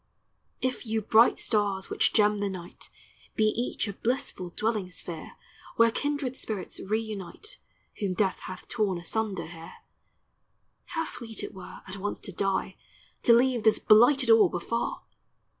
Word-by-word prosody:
If 255 Hz, 0 st, -1 dB
yon 220 Hz, 0 st, -1 dB
bright 225 Hz, +2 st, +6 dB
stars 205 Hz, -3 st, 0 dB
which -, -, +2 dB
gem 210 Hz, -1 st, +3 dB
the 200 Hz, 0 st, 0 dB
night 180 Hz, -2 st, -8 dB, 0.5 s
Be 220 Hz, -, +2 dB
each 220 Hz, +2 st, 0 dB
a 200 Hz, -, -4 dB
blissful 210 Hz, -5 st, -2 dB
dwelling 210 Hz, 0 st, -1 dB
sphere 170 Hz, -3 st, -7 dB, 0.4 s
Where 230 Hz, 0 st, +5 dB
kindred 285 Hz, -1 st, -2 dB
spirits 210 Hz, -7 st, -5 dB
reunite 215 Hz, -, -4 dB, 0.4 s
Whom 195 Hz, -3 st, -1 dB
death 195 Hz, -2 st, +1 dB
hath 185 Hz, -, -8 dB
torn 210 Hz, -6 st, 0 dB
asunder 195 Hz, +2 st, -2 dB
here, 165 Hz, 0 st, -10 dB, 1.1 s
How 325 Hz, -1 st, -2 dB
sweet 225 Hz, -7 st, -3 dB
it -, -, -6 dB
were 185 Hz, -, -10 dB
at 190 Hz, +1 st, -7 dB
once 205 Hz, +2 st, -3 dB
to -, -, -6 dB
die, 190 Hz, 0 st, -1 dB, 0.4 s
To 235 Hz, -, +6 dB
leave 245 Hz, 0 st, +4 dB
this 220 Hz, 0 st, +5 dB
blighted 245 Hz, +3 st, +5 dB
orb 215 Hz, -6 st, +6 dB
afar! 230 Hz, +7 st, -2 dB
215 Hz, 145 wpm, -28 LUFS, 190-230 Hz, 1.1 s, bright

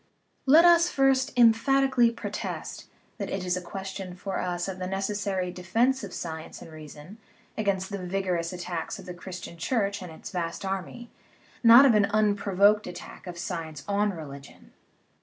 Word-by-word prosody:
Let 315 Hz, +6 st, +7 dB
us 345 Hz, 0 st, +6 dB
first 270 Hz, -1 st, +2 dB
emphatically 245 Hz, +2 st, +4 dB
protest 230 Hz, -, -6 dB, 0.3 s
that -, -, -3 dB
it 190 Hz, -1 st, -3 dB
is 180 Hz, 0 st, 0 dB
a 180 Hz, -, -3 dB
question 190 Hz, 0 st, -7 dB
for 190 Hz, +1 st, -4 dB
us 175 Hz, 0 st, -2 dB
of 190 Hz, -1 st, -5 dB
the 185 Hz, -, -3 dB
necessary 195 Hz, -1 st, -2 dB
defence 225 Hz, +9 st, 0 dB
of 200 Hz, -, -6 dB
science 160 Hz, -2 st, -6 dB
and 165 Hz, -, -12 dB
reason 155 Hz, +6 st, -12 dB, 0.4 s
against 200 Hz, -2 st, -1 dB
the 200 Hz, -2 st, -4 dB
vigorous 180 Hz, -2 st, -2 dB
attacks 175 Hz, -2 st, -5 dB
of -, -, -11 dB
the 180 Hz, -, -7 dB
Christian 175 Hz, -1 st, -9 dB
Church 200 Hz, +1 st, -1 dB
and 180 Hz, -2 st, -8 dB
its 160 Hz, -, -10 dB
vast 170 Hz, +1 st, -4 dB
army, 190 Hz, -, -5 dB, 0.5 s
not 235 Hz, +4 st, +9 dB
of 260 Hz, -, +6 dB
an 210 Hz, -1 st, +4 dB
unprovoked 205 Hz, 0 st, +2 dB
attack 175 Hz, -, -10 dB
of 175 Hz, -1 st, -7 dB
science 165 Hz, -4 st, -5 dB
on 205 Hz, +1 st, +1 dB
religion. 140 Hz, -6 st, -10 dB
195 Hz, 160 wpm, -27 LUFS, 175-215 Hz, 0.5 s, not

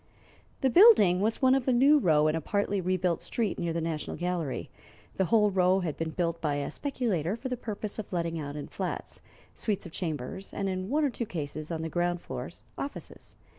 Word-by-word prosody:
The 265 Hz, -, +3 dB
building 290 Hz, -, +7 dB
was 220 Hz, +6 st, 0 dB
one 260 Hz, 0 st, +6 dB
of 270 Hz, -1 st, +1 dB
a -, -, +4 dB
new 275 Hz, +5 st, +6 dB
row 155 Hz, -, +4 dB
in 155 Hz, -, +1 dB
a 165 Hz, -, -1 dB
partly 200 Hz, +3 st, 0 dB
rebuilt 180 Hz, -1 st, 0 dB
street 225 Hz, -3 st, -2 dB
near 170 Hz, -1 st, -1 dB
the 165 Hz, -, -1 dB
National 160 Hz, -2 st, -3 dB
Gallery. 175 Hz, -5 st, -2 dB, 0.5 s
The 190 Hz, -, +2 dB
whole 210 Hz, +3 st, +4 dB
row 185 Hz, 0 st, +3 dB
had 165 Hz, -5 st, -2 dB
been 165 Hz, 0 st, -3 dB
built 170 Hz, 0 st, -2 dB
by 150 Hz, -3 st, 0 dB
a 145 Hz, 0 st, -3 dB
speculator 210 Hz, -, -1 dB
for 260 Hz, +3 st, -5 dB
the 250 Hz, -, -1 dB
purpose 215 Hz, -2 st, -5 dB
of 210 Hz, -, -6 dB
letting 170 Hz, -2 st, -1 dB
out 145 Hz, -1 st, -5 dB
in 150 Hz, -, -5 dB
flats, -, -, -5 dB, 0.3 s
suites 210 Hz, -4 st, -2 dB
of 175 Hz, -, -8 dB
chambers, 160 Hz, +1 st, -4 dB
and 195 Hz, -, -1 dB
in 185 Hz, 0 st, -3 dB
one 300 Hz, +4 st, +2 dB
or 280 Hz, -, +1 dB
two 235 Hz, -1 st, -4 dB
cases, 155 Hz, -3 st, -5 dB
on 165 Hz, -1 st, -3 dB
the -, -, -2 dB
ground 175 Hz, +1 st, 0 dB
floors, -, -, -7 dB, 0.2 s
offices. 280 Hz, -, -7 dB
180 Hz, 210 wpm, -29 LUFS, 165-220 Hz, 0.5 s, building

